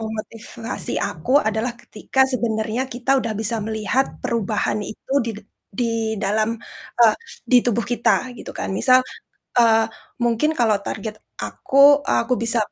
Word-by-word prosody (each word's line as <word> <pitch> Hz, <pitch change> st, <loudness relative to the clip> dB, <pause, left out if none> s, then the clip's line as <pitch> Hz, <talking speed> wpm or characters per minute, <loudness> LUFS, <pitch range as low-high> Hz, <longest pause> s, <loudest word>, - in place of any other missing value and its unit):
memotivasi 220 Hz, +1 st, -5 dB
aku 200 Hz, +4 st, -3 dB
adalah 220 Hz, -1 st, -1 dB
ketika 265 Hz, +5 st, -3 dB
sebenarnya 225 Hz, 0 st, -1 dB
kita 245 Hz, +2 st, -4 dB
udah 225 Hz, -1 st, -2 dB
bisa 225 Hz, +1 st, 0 dB
melihat 220 Hz, +4 st, 0 dB, 0.2 s
perubahan 215 Hz, -2 st, -1 dB
itu 220 Hz, +5 st, -8 dB
di 230 Hz, -, -2 dB
dad 210 Hz, -, -12 dB, 0.3 s
di 235 Hz, +4 st, -1 dB, 0.3 s
dalam, 215 Hz, +2 st, +1 dB, 0.5 s
eee, 225 Hz, -2 st, +7 dB, 0.3 s
di 250 Hz, -, +6 dB
tubuh 235 Hz, -1 st, +1 dB
kita, 240 Hz, +2 st, +2 dB
gitu -, -, -8 dB
kan. -, -, -5 dB
Misal, 255 Hz, +5 st, +5 dB, 0.6 s
eee, 225 Hz, -1 st, +5 dB, 0.4 s
mungkin 235 Hz, +6 st, +2 dB
kalau 225 Hz, -4 st, +3 dB
target 215 Hz, +1 st, -5 dB, 0.2 s
aku, 270 Hz, -, -5 dB, 0.3 s
aku 230 Hz, +2 st, +1 dB
bisa 230 Hz, 0 st, +1 dB
225 Hz, 135 wpm, -21 LUFS, 215-240 Hz, 0.6 s, eee